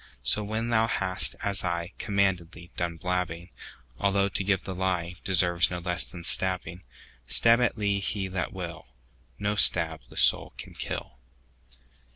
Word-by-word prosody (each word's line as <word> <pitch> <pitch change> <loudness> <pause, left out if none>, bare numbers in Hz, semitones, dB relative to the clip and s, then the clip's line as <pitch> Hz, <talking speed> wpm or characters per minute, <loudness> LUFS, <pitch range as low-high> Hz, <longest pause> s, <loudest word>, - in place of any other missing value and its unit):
So 105 - +1
when 110 +3 -3
thou 115 -1 +3
hast, 95 -4 0
as 100 -1 +1
ICommanded 90 0 -1
thee, 85 +2 -13
done 85 -1 -3
blabbing,—Although 90 +3 -3
to 100 - -1
give 95 -1 0
the 95 - -5
lieDeserves 90 -1 +1
no 90 - -4
less 90 0 -3
than 90 -2 -10
stabbing,—Stab 95 - +1
at 125 - +1
thee 100 -2 0
he 100 0 -2
that 90 -3 -3
will, - - -7 0.5
No 105 0 -1
stab 80 -6 +5
the - - -11
soul - - +5
can - - -9
kill. 65 - -6
95 Hz, 140 wpm, -27 LUFS, 85-100 Hz, 0.5 s, stab